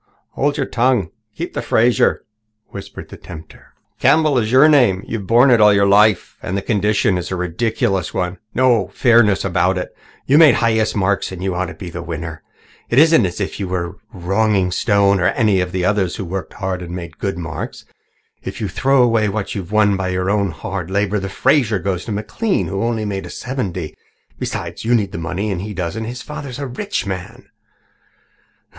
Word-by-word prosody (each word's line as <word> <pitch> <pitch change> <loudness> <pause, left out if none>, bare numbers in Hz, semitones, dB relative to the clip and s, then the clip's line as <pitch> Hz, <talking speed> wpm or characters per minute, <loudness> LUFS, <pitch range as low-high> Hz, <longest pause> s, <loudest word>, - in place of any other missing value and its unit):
"Hold 145 +1 -1
your 140 - 0
tongue 125 0 +2
and 85 -5 -7 0.3
keep - - -5
the - - -3
Fraser," 120 +2 +2 0.5
whispered 100 0 -9
the - - -10
tempter. 80 -2 -13 0.2
"Campbell 145 0 +3
is 110 -1 -2
your 130 +4 +7
name. 120 -11 +4
You've 105 -5 -5
borne 120 +4 +5
it 120 -3 +5
all 105 0 +7
your 100 0 +3
life. 100 0 +3
And 95 - -3
the 100 - -3
condition 105 -2 +1
itself 90 - -5
is - - -8
a - - -1
ridiculous 95 +1 -1
one 90 0 -3 0.2
no 120 -6 +3
fairness 115 -6 +3
about 95 0 +1
it. 90 - -5 0.3
You 145 +4 +4
made 155 -6 +7
the - - -1
highest 110 -2 +1
marks 100 -1 0
and 95 -1 -7
you 95 -1 -1
ought 95 +1 -2
to - - -9
be 90 -3 -8
the 90 - -6
winner. 80 -1 -6 0.5
It 120 - 0
isn't 155 - +6
as 90 - -7
if 100 - -4
you 100 - -3
were 90 0 -3 0.2
wronging 95 +1 0
Stone 100 0 +2
or 90 - +2
any 100 -2 +2
of 90 0 -3
the 90 -1 -1
others 95 -3 +1
who 95 - -5
worked 95 +2 -5
hard 95 -2 -3
and 90 0 -6
made 85 -3 -8
good 95 -2 -2
marks. 80 -3 -6 0.6
If - - -7
you 105 -4 -2
throw 135 +7 +3
away 115 -3 +2
what 105 0 -3
you've 95 -2 -6
won 105 -2 +3
by 95 -1 -2
your 90 +1 -1
own 100 -2 +1
hard 85 +2 -5
labour, 100 +1 0
the 95 0 -5
Fraser 125 0 +2
goes 95 0 -3
to - - -5
McLean, 110 - -1
who 95 +1 -3 0.3
made 100 -1 -2
only - - -9
seventy. 95 - -4 0.4
Besides, - - -5
you 120 +2 +2
need 100 -4 0
the - - -5
money 95 +5 -3
and 90 -2 -3
he 105 +1 -6
doesn't. 95 +5 -3
His 120 +2 -6
father 150 -2 -7
is 125 - -7
a 140 - -4
rich 135 - -3
man." 95 -2 -7
100 Hz, 205 wpm, -18 LUFS, 90-115 Hz, 0.6 s, your